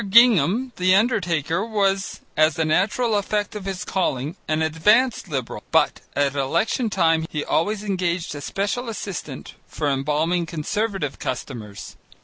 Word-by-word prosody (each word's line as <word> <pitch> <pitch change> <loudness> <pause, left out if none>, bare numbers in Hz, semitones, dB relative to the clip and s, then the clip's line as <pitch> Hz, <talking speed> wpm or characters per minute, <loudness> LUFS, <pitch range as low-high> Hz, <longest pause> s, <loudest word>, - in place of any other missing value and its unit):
Gingham, 230 - +5
the 185 +1 +4
undertaker, 185 - +1
was, 195 -4 0
as 155 +1 +3
a 160 - +1
natural 210 +8 +1
effect 205 0 -1
of 205 -2 -6
his 195 -2 -4
calling, 150 -5 -1
an 155 0 +1
advanced 210 +11 +3
Liberal, 135 -7 -4
but - - +2
at 140 -1 +2
election 170 - 0
time 165 -4 +2
he 150 -2 -3
always 205 +5 0
engaged 180 -5 -1
a 145 - -7
special 205 - -2
assistant 185 -10 -6
for 150 - -3
embalming 150 +5 0
Conservative 185 -1 -2
customers. 115 -5 -6
180 Hz, 135 wpm, -23 LUFS, 155-210 Hz, -, Gingham